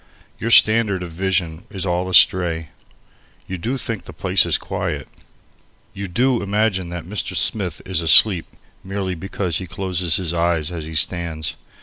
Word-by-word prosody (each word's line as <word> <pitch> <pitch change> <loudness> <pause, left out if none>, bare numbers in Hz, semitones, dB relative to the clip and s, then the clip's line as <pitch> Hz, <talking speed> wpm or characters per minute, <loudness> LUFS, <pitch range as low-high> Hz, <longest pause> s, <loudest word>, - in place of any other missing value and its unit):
Your 115 - -2
standard 110 -4 +5
of 85 - -7
vision 90 -1 -2
is 95 -3 -5
all 90 0 -1
astray, 85 -2 +4 0.8
You 95 -1 -6
do 120 +9 -2
think 115 -8 -4
the - - -9
place - - +2
is - - +2
quiet. - - -4 0.9
You 100 0 -6
do 125 +7 +1
imagine 100 -3 -1
that 85 -1 -6
Mr. 95 -1 -4
Smith 90 0 0
is 90 -3 -1
asleep 80 +3 +5 0.4
merely 95 -1 -3
because 90 -1 -3
he 95 - -7
closes 90 -3 0
his 85 -3 -1
eyes 85 -2 0
as 80 -3 -6
he 80 0 -8
stands. 80 -1 0
90 Hz, 155 wpm, -20 LUFS, 85-100 Hz, 0.9 s, standard